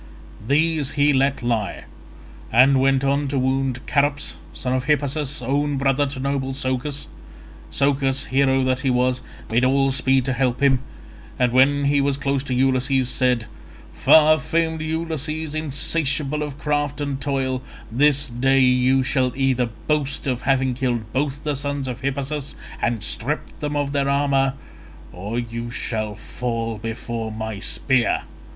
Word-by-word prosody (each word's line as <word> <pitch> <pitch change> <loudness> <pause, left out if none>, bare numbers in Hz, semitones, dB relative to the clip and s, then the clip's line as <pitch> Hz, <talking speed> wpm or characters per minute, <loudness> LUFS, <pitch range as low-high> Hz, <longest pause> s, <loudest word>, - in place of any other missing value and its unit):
These 155 0 +2
he 145 0 +3
let 135 -1 +1
lie, 115 -4 -1 0.7
and 130 +4 +5
went 135 0 +2
on 140 +1 +1
to 135 +1 -2
wound 130 -1 0
Charops 145 - 0
son 125 +10 -3
of 130 -1 -1
Hippasus 145 -1 0
own 145 +3 0
brother 135 +1 +1
to 135 -1 -6
noble 135 0 -2
Socus. 130 +2 -3 0.7
Socus, 135 -1 +1
hero 135 0 +2
that 130 0 +1
he 135 - 0
was, 125 0 +1 0.3
made 120 +3 +2
all 135 +1 +3
speed 130 -1 +2
to 130 - 0
help 125 -1 0
him, 135 -2 +3 0.6
and 125 -1 +2
when 140 +3 +4
he 140 0 +3
was 140 0 0
close 140 -1 -1
to 130 - -3
Ulysses 130 0 +2
he 130 - +2
said, 125 -2 +1 0.5
"Far 155 0 +5
famed 160 +1 -1
Ulysses, 160 -1 -2
insatiable 150 -1 +1
of 145 -2 -5
craft 145 -1 -1
and 140 -2 -3
toil, 130 -2 -1 0.3
this 140 +3 +3
day 135 +2 +2
you 130 +1 +3
shall 130 -1 +1
either 130 -2 +1 0.2
boast 150 -2 -1
of 125 -3 -1
having 130 -1 +1
killed 120 -4 -2
both 140 +1 -1
the 150 -2 -1
sons 140 0 -2
of 125 -1 -5
Hippasus 140 +1 -3 0.3
and 115 -3 0
stripped 130 +7 -2
them 150 -1 -3
of 145 -1 -1
their 140 -1 0
armour, 140 -1 +2 0.6
or 100 +6 -5
you 115 0 -4
shall 110 -3 -3
fall 115 0 -4
before 115 0 -5
my 110 -1 -5
spear." 130 +3 +1
135 Hz, 155 wpm, -22 LUFS, 125-145 Hz, 0.7 s, and